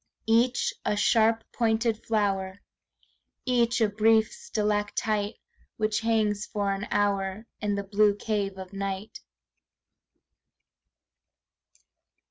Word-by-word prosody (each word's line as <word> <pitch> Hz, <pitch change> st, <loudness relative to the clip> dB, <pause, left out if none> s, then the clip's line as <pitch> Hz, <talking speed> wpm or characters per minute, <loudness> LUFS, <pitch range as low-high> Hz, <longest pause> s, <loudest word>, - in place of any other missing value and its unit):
Each 235 Hz, +3 st, +2 dB
a -, -, 0 dB
sharp 225 Hz, +1 st, +3 dB
pointed 225 Hz, -1 st, 0 dB
flower, 195 Hz, -3 st, 0 dB, 0.9 s
Each 240 Hz, -2 st, +2 dB
a 220 Hz, -, +5 dB
brief 220 Hz, +1 st, +3 dB
stalactite 210 Hz, -, -1 dB, 0.4 s
Which 215 Hz, -1 st, 0 dB
hangs 215 Hz, -2 st, 0 dB
for 205 Hz, -2 st, -1 dB
an 195 Hz, +2 st, -4 dB
hour 200 Hz, +1 st, 0 dB
In 205 Hz, -1 st, -1 dB
the 200 Hz, -, -2 dB
blue 205 Hz, +1 st, +3 dB
cave 205 Hz, -2 st, -2 dB
of 190 Hz, 0 st, -9 dB
night. 195 Hz, +2 st, -4 dB
210 Hz, 100 wpm, -27 LUFS, 200-225 Hz, 0.9 s, a